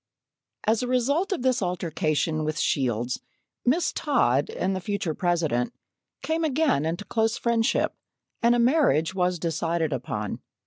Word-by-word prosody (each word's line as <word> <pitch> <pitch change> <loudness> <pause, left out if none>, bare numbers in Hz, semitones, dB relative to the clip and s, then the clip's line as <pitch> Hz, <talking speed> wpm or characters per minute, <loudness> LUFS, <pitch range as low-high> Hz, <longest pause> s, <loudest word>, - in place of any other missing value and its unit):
As 220 +1 +2
a 250 - -2
result 275 +10 +1
of 360 -10 -1
this 255 -3 +2
altercation 165 -3 -1
with 155 0 -2
Shields, 125 -4 0 0.4
Miss 315 +8 +2
Todd 145 - +2
and 190 +1 -1
the - - -2
future 195 -4 -2
President 160 -9 0 0.5
came 320 +1 0
again 280 - +2
into 175 +5 -3
close 225 -1 0
friendship, 230 -1 +1 0.5
and 235 +1 +4
a - - +2
marriage 235 - +3
was 180 -1 +1
decided 165 -1 -1
upon. 105 -5 -3
180 Hz, 140 wpm, -26 LUFS, 155-245 Hz, 0.5 s, and